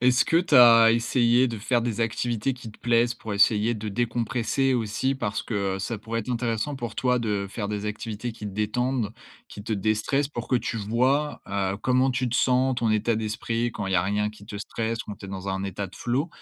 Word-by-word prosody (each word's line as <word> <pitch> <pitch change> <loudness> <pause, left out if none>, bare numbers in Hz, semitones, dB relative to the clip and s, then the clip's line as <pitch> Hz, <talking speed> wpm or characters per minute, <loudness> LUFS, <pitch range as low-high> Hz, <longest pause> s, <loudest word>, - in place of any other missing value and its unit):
Est-ce 125 0 +4
que 165 - +2
tu 170 -4 +3
as 115 -2 +8
essayé 120 +1 +3
de 115 -3 -4
faire 120 +3 +1
des 115 -2 -2
activités 115 +2 -1
qui 115 -4 -10
te - - -17
plaisent? 120 0 +2
Pour 110 -4 -6
essayer 105 +3 +4
de 110 0 -5
décompresser 120 +4 0
aussi 120 +4 0
parce 105 -6 -3 0.3
ça 100 +4 -3
pourrait 115 +2 -3
être 115 - -6
intéressant 120 +3 -1
pour 120 -4 -6
toi, 125 -1 +1
de 105 -3 -1
faire 100 0 -4
des 105 0 -3
activités 110 +2 -4
qui 105 -1 -8
détendent, 110 +3 -1 0.3
qui 100 - -10
te 110 +1 -3
dé-stressent 110 +7 0
pour 120 -5 -6
que 130 - +3
tu 120 - -3
vois, 130 +8 0
heu, 100 -1 -1
comment 130 +2 +2
tu 125 0 -1
te 120 - -3
sens, 130 0 +3
ton 115 -2 0
état 110 +2 +1
d'esprit 110 +2 -2
quand 105 -3 -5
il 95 - -2
y - - +2
a 90 - +3
rien 105 +2 0
qui 105 -1 -12
te 105 0 -8
stresse, 115 +2 -3
quand 105 - -6
tu 100 - -11
es - - -10
dans 95 0 -6
un 95 0 -2
état 100 0 -4
de 95 - -15
flow, 130 +7 -1
115 Hz, 225 wpm, -25 LUFS, 105-125 Hz, 0.3 s, as